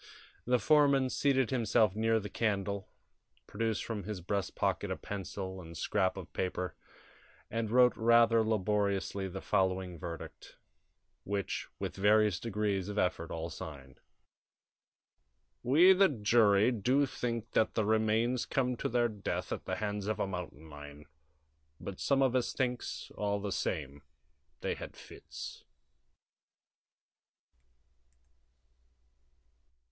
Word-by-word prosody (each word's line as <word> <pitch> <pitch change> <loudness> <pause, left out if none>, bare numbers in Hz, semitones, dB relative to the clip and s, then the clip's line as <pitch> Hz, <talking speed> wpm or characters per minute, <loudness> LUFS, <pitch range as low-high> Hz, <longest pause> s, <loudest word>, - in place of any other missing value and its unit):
The 125 +1 +3
foreman 140 -2 +4
seated 135 -3 +2
himself 110 -4 +2
near 110 +1 +2
the 105 - -6
candle, 100 -3 -2 0.6
produced 110 0 -2
from 110 -3 -3
his 105 -2 -4
breast 95 +2 -3
pocket - - 0
a - - -1
pencil 95 -1 -6
and 85 -1 -10
scrap 95 0 0
of - - -9
paper, 90 0 -2 0.8
and 115 -1 -1
wrote 125 +1 +5
rather 115 0 +5
laboriously 100 -2 0
the 95 +1 -7
following 95 -2 0
verdict, 85 +1 -8 0.7
which 100 -1 -3
with - - -4
various 105 -1 +3
degrees 105 -3 -1
of 105 - -5
effort 90 -4 0
all 80 0 -4
signed: 70 -4 -9 1.6
"We, 165 +9 +6
the 195 +1 +5
jury, 110 -3 +4
do 125 +5 +2
find 120 -3 -3
that 110 - +1
the 110 - +1
remains 110 +3 +1
come 125 -2 0
to - - -2
their 120 0 +2
death 105 -3 -4
at - - -4
the 95 - -2
hands 105 0 -3
of 110 - -1
a - - +1
mountain 90 -5 -6
lion, 75 0 -11 0.7
but 95 - -7
some 135 -1 +2
of 130 -1 +2
us 125 - 0
thinks, 125 -2 -3
all 100 -1 -1
the 100 0 -4
same, 70 -6 -3 0.6
they - - -1
had - - -9
fits." - - -10
105 Hz, 125 wpm, -32 LUFS, 95-115 Hz, 1.6 s, We